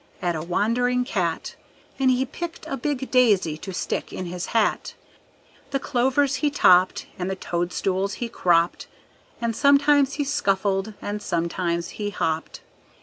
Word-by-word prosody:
At 175 -1 -1
a 155 - -3
wandering 235 +8 +1
cat, 175 -8 -2 0.4
And 265 -1 +3
he 255 +1 +2
picked 340 +6 -7
a - - -3
big 270 0 -3
daisy 210 -11 +3
to 190 - -7
stick 180 - -3
in 185 - -5
his 175 0 -5
hat; 225 -2 0 0.7
The 275 -1 -1
clovers 265 +2 +1
he 300 - +1
topped, 185 -10 +4
And 180 +1 -2
the 190 - -2
toadstools 185 +2 -2
he 240 - -4
cropped, 175 -6 +1 0.5
And 235 -1 -1
sometimes 280 0 +4
he 290 - -1
scuffled 205 -7 0
and 205 0 -3
sometimes 170 -1 -1
he 205 - -1
hopped. 160 -4 -3
205 Hz, 145 wpm, -24 LUFS, 180-265 Hz, 0.7 s, topped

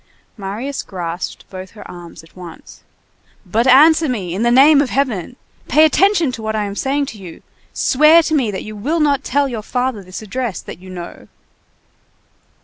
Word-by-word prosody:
Marius 220 +7 -5
grasped 175 -2 -6
both 185 0 -8
her - - -10
arms 175 -2 -11
at 165 - -21
once. 180 -3 -12 0.6
"But 225 +7 0
answer 310 +4 +6
me, 190 -9 -3
in 195 - -3
the 235 - +2
name 280 +4 +6
of 280 - -1
Heaven! 245 -6 -2 0.3
pay 310 +1 +5
attention 345 -2 +2
to 230 - -7
what 220 0 -3
I 215 - 0
am 200 0 -6
saying 280 +5 -1
to 210 - -13
you, 180 -4 -11 0.3
swear 305 +5 +4
to 315 - -2
me 265 -7 +1
that 190 -2 -5
you 215 0 -8
will 290 +11 -2
not 285 -2 +1
tell 285 +2 +1
your 235 -5 -5
father 250 -1 -2
this 185 +3 -9
address 220 -2 -4
that - - -10
you 185 +1 -13
know!" 175 -2 -9
235 Hz, 185 wpm, -18 LUFS, 190-280 Hz, 0.6 s, answer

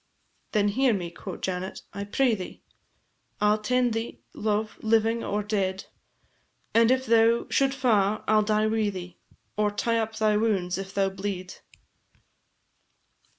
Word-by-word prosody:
"Then 205 -2 +3
hear 250 +2 +2
me," 175 -3 -4
quo' 185 +1 -8
Janet, 185 0 -4
"I 200 0 -4
pray 245 +4 +2
thee, 185 -4 -6 0.8
I 210 0 +4
'll 215 - -1
tend 250 +2 +1
thee, 225 - -4
love, 215 0 -2
living 225 +1 +2
or 205 +1 -1
dead, 195 -2 -1 0.9
And 230 0 +5
if 260 0 +2
thou 230 0 +4
should 270 0 +2
fa' 215 -6 +2
I - - +3
'll - - +5
die 215 0 +1
wi' 215 -1 +1
thee, 180 -3 -8 0.4
Or 210 0 +2
tie 230 +3 0
up 220 0 -3
thy 215 -1 +2
wounds 195 -5 0
if 195 0 -6
thou 195 -1 +2
bleed." 190 -1 -5
215 Hz, 150 wpm, -26 LUFS, 195-225 Hz, 0.9 s, And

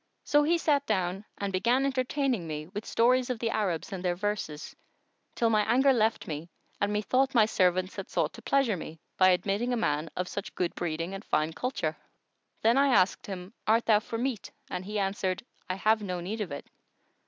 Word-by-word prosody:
So 295 - +4
he 330 +4 +3
sat 290 -4 +2
down 190 -1 -1
and 200 -1 -3
began 240 +8 +2
entertaining 260 - 0
me 150 -1 -4
with 205 +6 -7
stories 250 +2 +3
of 250 - -1
the 225 0 -1
Arabs 190 -5 -1
and 185 -1 -5
their 175 -1 +1
verses, 190 -6 -3 0.6
till 230 -1 +2
my 215 -1 +4
anger 265 +3 +5
left 220 -2 +1
me 155 +2 -5 0.3
and 205 0 +1
methought 255 +6 +1
my 220 -2 +7
servants 185 -2 +1
had - - -6
sought - - 0
to - - -11
pleasure 275 -7 +2
me 160 -2 -8 0.2
by 185 0 +7
admitting 200 +7 +1
a - - +1
man 155 -7 0
of 180 - -1
such 200 +2 -6
good 180 -2 -1
breeding 165 +2 -3
and 195 +1 -6
fine 155 -4 0
culture. 250 +11 -2 0.7
Then 230 +3 +5
I 280 - +5
asked 195 -8 +3
him, 190 0 -7
"Art 225 +2 +3
thou 215 -2 +5
for 230 +1 -5
meat?"; 245 -2 -2 0.2
and 180 - -3
he 210 +2 -4
answered, 195 -1 -1 0.3
"I 185 - 0
have 215 +3 +2
no 180 -3 -3
need 205 +6 -4
of 190 -7 -4
it." 140 - -6
210 Hz, 200 wpm, -29 LUFS, 180-240 Hz, 0.7 s, my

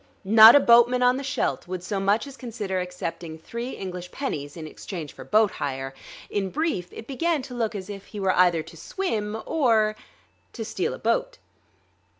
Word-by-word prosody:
Not 220 +4 +9
a - - +9
boatman 240 0 +5
on 250 +1 +4
the 275 - -5
Scheldt 270 -8 -2
would 180 -1 -5
so 195 +1 -2
much 200 +5 +1
as 280 -1 -10
consider 215 -7 -4
accepting 175 -2 -5
three 235 +10 -6
English 180 -1 -6
pennies 145 - -4
in 160 - -7
exchange 155 -1 -7
for - - -10
boat 215 -1 +3
hire. 135 -1 -4 0.3
In 195 -2 -2
brief, 240 - -2
it 225 - -9
began 295 +3 -1
to 255 - -9
look 225 -3 -2
as 190 -2 -6
if 200 -1 -8
he 210 - -8
were 190 -1 +2
either 175 -3 +4
to 165 +1 -14
swim 215 - -3
or... 225 -8 +2 0.6
to - - -5
steal - - -2
a - - -10
boat. - - -1
210 Hz, 185 wpm, -25 LUFS, 180-250 Hz, 0.6 s, Not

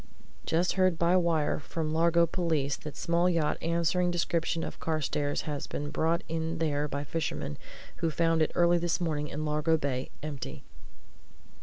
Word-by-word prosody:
"Just 170 +3 +2
heard 185 -3 +3
by 170 +2 +3
wire 165 -4 +2
from 155 +1 -3
Largo 170 +1 +4
police 160 -5 0
that 150 -2 -9
small 170 +2 +2
yacht 165 -4 +1
answering 170 +2 +1
description 170 -1 0
of - - -6
Carstairs' 150 -3 -1
has 145 -2 -4
been 145 0 -4
brought 165 +4 +1
in 165 +1 -2
there 150 -2 0
by 140 0 -3
fishermen 145 - -3 0.4
who 165 - 0
found 165 0 +2
it 155 - +2
early 175 0 +4
this 175 +1 0
morning 155 -4 -1
in 150 +1 -4
Largo 150 +2 +2
Bay, 135 -3 -2
empty." 145 -3 -6
160 Hz, 160 wpm, -29 LUFS, 150-170 Hz, 0.4 s, Largo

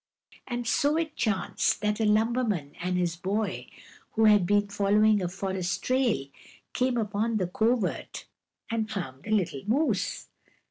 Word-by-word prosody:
And 240 -1 -3
so 290 +6 +2
it 320 -2 -2
chanced 205 -5 0
that 210 0 0
a 220 - +2
lumberman 215 - +1
and 180 +1 -1
his 175 -2 0
boy, 195 +3 -2 0.5
who 225 0 +3
had 210 -4 +5
been 205 +1 +3
following 205 +1 +3
a 180 - -1
forest 190 -1 -3
trail, 255 - +1 0.5
came 255 -1 +1
upon 215 +1 0
the 185 - 0
covert 220 +3 -1 0.5
and 220 -1 -1
found 155 -11 -5
the - - -10
little 185 -10 0
moose. 285 +8 0
210 Hz, 145 wpm, -27 LUFS, 190-230 Hz, 0.5 s, had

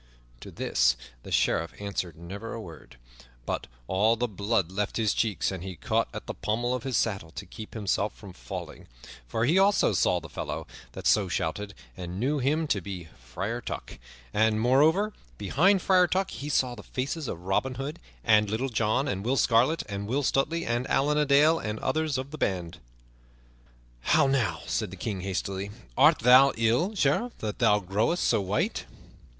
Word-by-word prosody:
To - - -10
this - - +1 0.2
the - - -11
Sheriff 85 0 +1
answered 100 -5 -4
never 100 +7 -7
a - - -5
word, 85 -7 -11 0.5
but - - -3 0.2
all 105 - +3
the 120 +2 -1
blood 100 -3 -1
left 105 +2 -2
his 110 -3 +2
cheeks, 110 -3 0
and 95 -2 -6
he 95 -1 -6
caught 80 - 0
at - - -7
the - - -4
pommel 120 +3 -1
of 125 - -2
his 130 -1 -1
saddle 95 -7 -1
to 100 - -7
keep 110 +5 -10
himself 105 -1 -1
from 100 -3 -11
falling; - - -8 0.4
for 110 - 0
he 165 +9 +4
also 200 +1 +4
saw - - +2
the - - -10
fellow - - -5 0.3
that - - -8
so 105 -3 +4
shouted, 100 +4 -3 0.2
and 90 +1 -6
knew 140 +5 +1
him 150 +5 +1
to 100 - +1
be 90 -3 -7
Friar 95 - -4
Tuck; - - -7 0.3
and, 110 0 +3
moreover, 155 - +3 0.2
behind 175 - +3
Friar 185 -2 +5
Tuck 190 +2 0
he 145 - -6
saw 130 -3 +1
the 110 - -9
faces 135 +6 -4
of 85 - -4
Robin 125 +7 0
Hood 140 +5 -5 0.2
and 105 -2 +4
Little 120 +6 -1
John 115 +4 +1
and 100 -7 -2
Will 130 +4 +1
Scarlet 125 +8 +3
and 100 0 -4
Will 135 +6 0
Stutely 155 +6 +1
and 120 +2 -1
Allan 150 +2 +2
a 150 - +2
Dale 150 +4 +5
and 105 0 -3
others 155 0 0
of 130 +2 -5
the 155 - -8
band. 90 -5 -2 1.2
"How 100 - +4
now," 120 -11 +1
said 110 -3 -1
the 95 - -10
King 95 0 -3
hastily, 95 +1 -3 0.3
"art - - +6
thou 130 +4 +7
ill, 120 - +2
Sheriff, 195 - +1
that 105 -1 -5
thou 110 -4 +5
growest 105 - 0
so - - +2
white?" 100 +2 -1
110 Hz, 185 wpm, -27 LUFS, 100-135 Hz, 1.2 s, thou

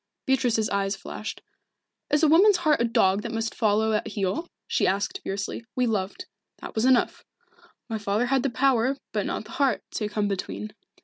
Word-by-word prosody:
Beatrice's 245 -5 +2
eyes 195 0 0
flashed. 200 +3 -7 0.7
"Is 295 +2 +2
a - - +7
woman's 370 +6 +6
heart 310 -7 +2
a - - +3
dog 200 -3 +3
that 230 - -5
must 225 0 -2
follow 220 0 +2
at 215 - 0
heel?" 215 - -2 0.2
she - - +1
asked 205 - -1
fiercely. 195 +3 -4
"We 250 - +2
loved. 215 - -2 0.3
That - - -9
was 220 +2 +1
enough. 255 -2 +3 0.6
My 225 -2 -3
father 205 +3 0
had 265 +1 +2
the 275 - 0
power, 260 +1 +2
but - - -1
not - - -3
the - - -12
heart, 275 -6 +1
to 210 -2 -2
come 205 0 0
between. 105 - -4
225 Hz, 185 wpm, -26 LUFS, 205-265 Hz, 0.7 s, a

